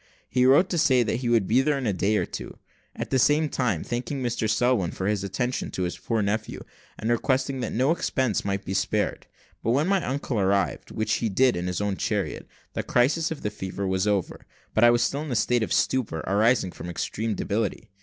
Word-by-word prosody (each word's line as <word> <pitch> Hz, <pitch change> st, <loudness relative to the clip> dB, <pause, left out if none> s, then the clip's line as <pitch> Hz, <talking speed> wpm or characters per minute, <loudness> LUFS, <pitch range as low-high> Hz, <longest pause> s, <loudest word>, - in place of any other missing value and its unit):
He 125 Hz, 0 st, +3 dB
wrote 145 Hz, +8 st, +6 dB
to 175 Hz, -, +1 dB
say 130 Hz, -4 st, +4 dB
that 115 Hz, 0 st, -1 dB
he 125 Hz, -1 st, -2 dB
would 115 Hz, -4 st, +3 dB
be 120 Hz, +7 st, +3 dB
there 150 Hz, +1 st, +1 dB
in 135 Hz, -, -3 dB
a 105 Hz, -, +1 dB
day 100 Hz, +3 st, +1 dB
or -, -, 0 dB
two; -, -, -8 dB, 0.4 s
at -, -, -5 dB
the 130 Hz, -, +3 dB
same 150 Hz, +4 st, +3 dB
time 110 Hz, -, -1 dB
thanking 130 Hz, +3 st, -3 dB
Mr 120 Hz, -2 st, -1 dB
Selwin 115 Hz, -5 st, +2 dB
for 95 Hz, -, -5 dB
his 105 Hz, -1 st, 0 dB
kind 100 Hz, -, -4 dB
attention 125 Hz, +7 st, -2 dB
to 95 Hz, -, -3 dB
his 90 Hz, -, -2 dB
poor 115 Hz, -3 st, -1 dB
nephew, 105 Hz, +2 st, -2 dB, 0.4 s
and 110 Hz, +2 st, -1 dB
requesting 130 Hz, +3 st, 0 dB
that 125 Hz, -, -3 dB
no 130 Hz, +6 st, +2 dB
expense 130 Hz, -, 0 dB
might 100 Hz, 0 st, -2 dB
be 95 Hz, -, -3 dB
spared. 100 Hz, +2 st, -1 dB, 0.3 s
When 135 Hz, +8 st, +1 dB
my 195 Hz, -2 st, +2 dB
uncle 130 Hz, -3 st, -2 dB
arrived, 100 Hz, 0 st, 0 dB
which 110 Hz, -, -1 dB
he 115 Hz, -, +1 dB
did 125 Hz, +5 st, +3 dB
in 90 Hz, +1 st, -3 dB
his 90 Hz, +2 st, -2 dB
own 100 Hz, -2 st, -1 dB
chariot, -, -, -2 dB, 0.3 s
the -, -, -1 dB
crisis 145 Hz, +7 st, +2 dB
of 160 Hz, -3 st, -6 dB
the 105 Hz, -, -1 dB
fever 100 Hz, 0 st, -5 dB
was 95 Hz, +1 st, 0 dB
over; 100 Hz, -4 st, -1 dB, 0.3 s
but 110 Hz, -, +3 dB
I 120 Hz, -, +8 dB
was 120 Hz, 0 st, +3 dB
still 140 Hz, +4 st, -1 dB
in 155 Hz, -2 st, -5 dB
a -, -, 0 dB
state 120 Hz, +2 st, +2 dB
of 110 Hz, -, -2 dB
stupor 110 Hz, -12 st, 0 dB
arising 105 Hz, +1 st, +2 dB
from 85 Hz, -, -8 dB
extreme 110 Hz, +5 st, -2 dB
debility. 105 Hz, 0 st, -2 dB
115 Hz, 225 wpm, -25 LUFS, 100-130 Hz, 0.4 s, I